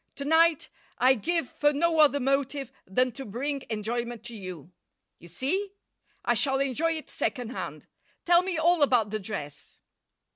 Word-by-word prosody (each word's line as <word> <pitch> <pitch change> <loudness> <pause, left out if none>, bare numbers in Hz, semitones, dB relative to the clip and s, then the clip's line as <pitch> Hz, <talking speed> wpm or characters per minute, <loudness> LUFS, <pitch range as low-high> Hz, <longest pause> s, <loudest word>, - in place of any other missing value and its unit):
To 280 - -6
night 320 +1 +3 0.3
I 255 +1 +5
give 330 - -1
for 295 +3 +1
no 325 +2 +1
other 285 -2 +5
motive 275 0 -1 0.2
than 250 +7 +1
to 270 +4 -8
bring 270 +6 -3
enjoyment 235 +2 -3
to 235 -1 -7
you. 185 -5 -8 0.5
You 170 - -14
see? 340 - -2 0.5
I - - +3
shall 270 -2 +2
enjoy 275 +5 +1
it 315 -1 -6
second 245 -4 -3
hand. - - -6 0.4
Tell 345 0 +6
me 365 -2 -2
all 340 +1 +3
about 245 -7 +3
the 215 - -2
dress." 185 -8 -7
270 Hz, 160 wpm, -27 LUFS, 230-315 Hz, 0.5 s, Tell